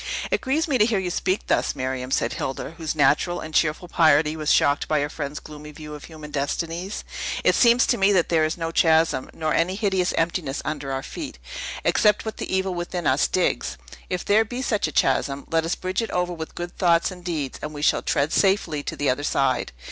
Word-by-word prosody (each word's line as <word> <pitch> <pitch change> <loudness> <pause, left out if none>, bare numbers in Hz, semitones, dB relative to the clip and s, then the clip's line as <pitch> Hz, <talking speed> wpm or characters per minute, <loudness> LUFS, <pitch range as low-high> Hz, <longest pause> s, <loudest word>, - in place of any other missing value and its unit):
"It - - +1
grieves 305 +6 0
me 270 -5 +1
to 210 - +6
hear 225 -3 +1
you 185 -2 -2
speak 185 +2 -1
thus, - - +1
Miriam," 130 0 -3
said - - 0
Hilda, 135 - -4
whose 160 -1 -2
natural 150 +4 +2
and 155 - -8
cheerful 160 +3 +1
piety 155 -2 +4
was 155 -1 0
shocked 145 0 +3
by 155 - +2
her 145 - -1
friend's 150 -1 -5
gloomy 150 0 -11
view 150 0 -9
of 150 - -9
human 155 -2 -10
destinies. 165 +7 -3 0.4
"It - - +4
seems 240 0 +5
to 240 - +1
me 195 +1 +4
that 180 -3 +2
there 160 -2 +3
is 155 +2 -1
no 165 -1 -3
chasm, 160 -4 +3
nor 155 -1 -2
any 180 +3 +1
hideous 190 -4 +1
emptiness 165 -4 -1
under 150 -2 -3
our 135 0 -3
feet, 300 - -7 0.5
except 210 0 +3
what 220 - -5
the - - -5
evil 190 0 0
within 175 -1 -4
us 135 +3 +3
digs. 180 - 0 0.3
If 180 -1 -3
there 215 +2 +4
be 245 +4 -5
such 210 -9 0
a - - -5
chasm, 135 0 +1
let 165 0 +2
us 165 - 0
bridge 185 +4 -2
it 225 - -3
over 180 0 -1
with 160 -2 -7
good 175 0 -6
thoughts 170 0 +3
and 180 -1 -11
deeds, 155 -6 -3
and 150 - -5
we 145 -1 -6
shall - - +3
tread 145 +3 0
safely 190 -6 +2
to - - -5
the 145 - -1
other 135 +3 -3
side. 135 -4 0
165 Hz, 225 wpm, -24 LUFS, 150-185 Hz, 0.5 s, to